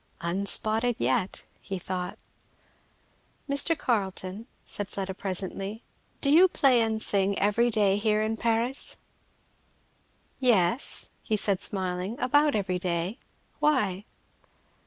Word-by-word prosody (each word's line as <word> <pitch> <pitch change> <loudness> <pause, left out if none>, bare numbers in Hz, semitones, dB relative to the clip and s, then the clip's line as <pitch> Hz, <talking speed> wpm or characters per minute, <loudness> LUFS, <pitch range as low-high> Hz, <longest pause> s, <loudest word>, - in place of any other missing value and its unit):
"Unspotted" 215 +6 +2
yet, 130 +10 0 0.2
he 195 - -5
thought. 180 0 -5 1.3
"Mr. 280 +3 +3
Carleton," 200 -3 -2 0.2
said 205 -2 -5
Fleda 195 -1 -4
presently, 195 +3 -3 0.4
"do 280 - +3
you 350 +5 +7
play 265 -8 +3
and 220 -1 0
sing 200 -2 +2
every 210 +4 +2
day 205 -3 +3
here 215 0 +1
in 220 +1 -1
Paris?" 230 +3 -1 1.4
"Yes," 235 -2 +1 0.3
said 200 -2 0
he - - -5
smiling, 185 +3 -3
"about 290 +3 +3
every 185 -3 -1
day. 175 +5 -2 0.4
Why?" 210 -10 +1
205 Hz, 110 wpm, -27 LUFS, 190-240 Hz, 1.4 s, you